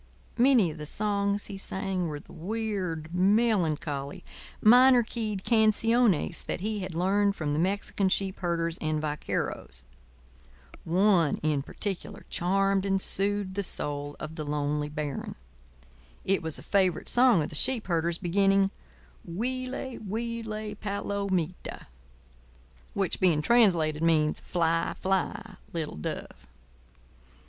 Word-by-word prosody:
Many 240 -9 +5
of 155 - -10
the 150 - -5
songs 200 +1 0
he 195 - -7
sang 190 -2 -2
were 150 -2 -5
the - - -16
weird, 185 -5 -3
melancholy, 180 -8 +1 0.4
minor 250 +2 +7
keyed 215 -4 -4
canciones 225 -3 +2
that - - -4
he 215 +1 -2
had 185 -3 -5
learned 200 +3 +2
from 145 -2 -2
the 150 - 0
Mexican 195 +2 0
sheep 190 0 0
herders 170 -2 -1
and 155 -1 -1
vaqueros. 145 - -4 1.0
One, 180 -3 +3
in 150 -2 +1
particular, 195 +6 -5
charmed 195 +2 +1
and 195 -1 +1
soothed 200 0 +1
the 200 - -1
soul 145 -5 -3
of 155 +2 -7
the 155 - -3
lonely 150 0 -1
baron. 150 -2 -4 0.9
It 195 - +2
was 160 -2 +1
a - - -10
favourite 190 -4 +1
song 240 -9 +5
of - - -4
the - - -8
sheep 250 - +1
herders, 170 -1 0
beginning: 195 +2 +2 0.5
"Huile, 255 +7 -4
huile, 220 0 -4
palomita," 200 -4 -3 1.1
which 195 -3 -1
being 165 -5 +3
translated 170 -9 +3
means, 155 -2 +2
"Fly, 165 -1 0
fly, 190 +1 -2
little 160 -3 -4
dove." 75 -4 -6
190 Hz, 125 wpm, -28 LUFS, 160-210 Hz, 1.1 s, minor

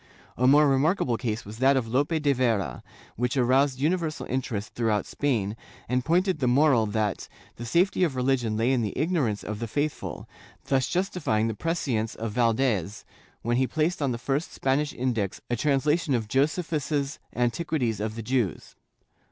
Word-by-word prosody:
^ - - -29 0.3
A 125 - +2
more 145 +2 +6
remarkable 135 -1 +2
case 110 -2 -3
was 105 +3 -9
that 135 +1 +4
of 120 -3 -1
Lope 130 +6 +1
de 150 -4 +2
Vera, 115 - 0 0.4
which 125 +3 -1
aroused 130 +2 +3
universal 160 +1 -1
interest 115 -5 -3
throughout 110 -4 0
Spain, 110 -8 -1 0.3
and 125 +1 0
pointed 180 +3 +1
the 130 - +1
moral 125 -3 +4
that 105 -1 -2 0.3
the 120 - -6
safety 180 +8 +2
of 155 -7 +1
religion 125 -4 0
lay 115 +3 +2
in 130 -2 +2
the 105 -3 -3
ignorance 150 - 0
of 105 0 -5
the 115 - -3
faithful, 145 +6 -3 0.4
thus 130 -2 +1
justifying 155 - 0
the 115 - -1
prescience 120 -6 -2
of 115 -1 -4
Valdes, 115 -4 0 0.4
when 120 +1 +1
he 130 0 +2
placed 160 +4 -1
on 140 -3 +1
the 120 - -2
first 135 +6 -2
Spanish 140 +2 0
Index 115 -6 -2
a - - +2
translation 145 +3 +1
of 110 -3 -2
Josephus's 145 - 0 0.2
Antiquities 120 -1 0
of 110 +1 -3
the 115 - -5
Jews. 120 -6 -2
130 Hz, 170 wpm, -26 LUFS, 115-145 Hz, 0.4 s, more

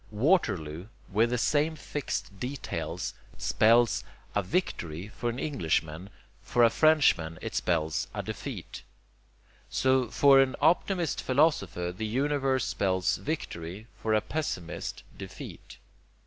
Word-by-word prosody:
'Waterloo,' 105 - +1 0.2
with 110 +4 +3
the 125 - 0
same 150 +5 +2
fixed 140 -9 -4
details, 130 +4 -4 0.2
spells 115 +2 +3 0.3
a 105 - +2
'victory' 90 - -2
for 120 +2 -3
an 120 - -4
englishman; 85 - -1 0.3
for 120 - +2
a 115 - +6
frenchman 125 - +3
it - - -6
spells 80 -3 0
a - - -4
'defeat.' - - -6 0.9
So, 130 -2 +2
for 135 +2 +6
an 135 -1 +3
optimist 170 +1 +2
philosopher 125 - +1
the 110 +3 -3
universe 135 +1 +1
spells 95 -2 0
victory, 100 - -5
for 110 -1 0
a 110 - +3
pessimist, 120 - -4
defeat. - - -9
115 Hz, 120 wpm, -29 LUFS, 90-145 Hz, 0.9 s, a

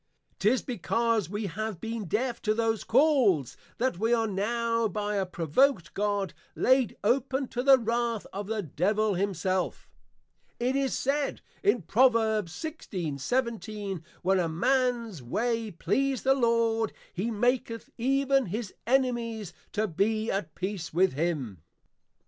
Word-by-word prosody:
'Tis 225 +6 +2
because 230 -2 0
we 205 +2 -3
have 210 0 -4
been 225 0 -4
Deaf 235 +7 -1
to 215 -1 +1
those 225 -2 0
Calls 240 - +3 0.2
that 250 -7 0
we 225 +2 +1
are 225 -1 +1
now 230 +3 0
by 210 +1 -2
a 195 -2 0
provoked 180 - +1
God, 205 -2 -1 0.2
laid 260 -3 +3
open 265 +4 +1
to 245 - -2
the 270 +1 +7
Wrath 235 -1 -1
of 200 +1 -4
the 215 -1 -2
Devil 200 +7 +1
himself. 185 -1 -1 0.7
It 250 +2 0
is 275 -1 0
said 280 +1 -1 0.2
in 250 - +2
Pr. 195 +8 -4
16.17. 215 - 0 0.2
_When 190 -1 +3
a 165 - -1
mans 235 - 0
ways 225 - -1
please 265 +9 0
the 270 - +5
Lord, 230 -3 +1 0.2
he 200 +6 -2
maketh 230 0 -1
even 270 0 +2
his 210 +2 -4
Enemies 235 -7 0 0.2
to 215 +1 +1
be 215 +5 0
at 185 -6 -3
peace 185 -3 -4
with 185 +1 +3
him. 140 - -2
220 Hz, 135 wpm, -28 LUFS, 195-245 Hz, 0.7 s, the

